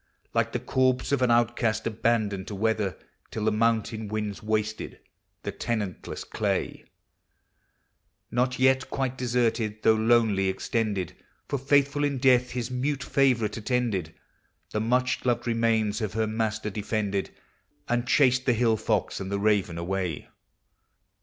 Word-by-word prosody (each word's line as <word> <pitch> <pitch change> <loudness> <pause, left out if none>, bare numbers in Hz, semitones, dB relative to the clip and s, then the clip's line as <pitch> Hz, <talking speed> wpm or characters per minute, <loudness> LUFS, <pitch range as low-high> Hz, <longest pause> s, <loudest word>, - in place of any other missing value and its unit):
Like - - +1
the - - -2
corpse 130 0 +1
of 140 -2 +2
an 125 - +3
outcast 115 -2 +2
abandoned 110 -3 0
to 105 - -5
weather, 105 -2 0 0.3
Till 110 - -3
the 110 - +3
mountain 110 -1 0
wiuds 105 -2 -3
wasted 110 0 -2 0.4
the - - -3
tenant 105 -6 -3
less - - -5
clay; - - -2 1.5
Not 125 +1 +1
yet 130 0 +3
quite 130 -2 -2
deserted, 115 -4 0
though 110 - +6
lonely 110 -3 +3
extended, 100 -2 -1 0.3
For, 140 - -2
faithful 140 +1 +2
in 145 -2 0
death, 125 -1 +4
his 125 0 -4
mute 135 +2 -1
favorite 125 -8 +2
attended, 110 -8 -1 0.6
The 105 - -1
much 125 +3 +1
loved 120 -2 0
remains 115 -2 +1
of 105 -2 -2
her 110 0 +1
master 110 -1 -2
defended, 105 -1 -2 0.6
And 120 0 0
chased 130 -1 +3
the 125 - +5
hill 115 -1 +2
fox - - -1
and 95 0 -5
the 100 - 0
raven 100 -4 +1
away. 90 -2 -3
115 Hz, 140 wpm, -27 LUFS, 105-125 Hz, 1.5 s, though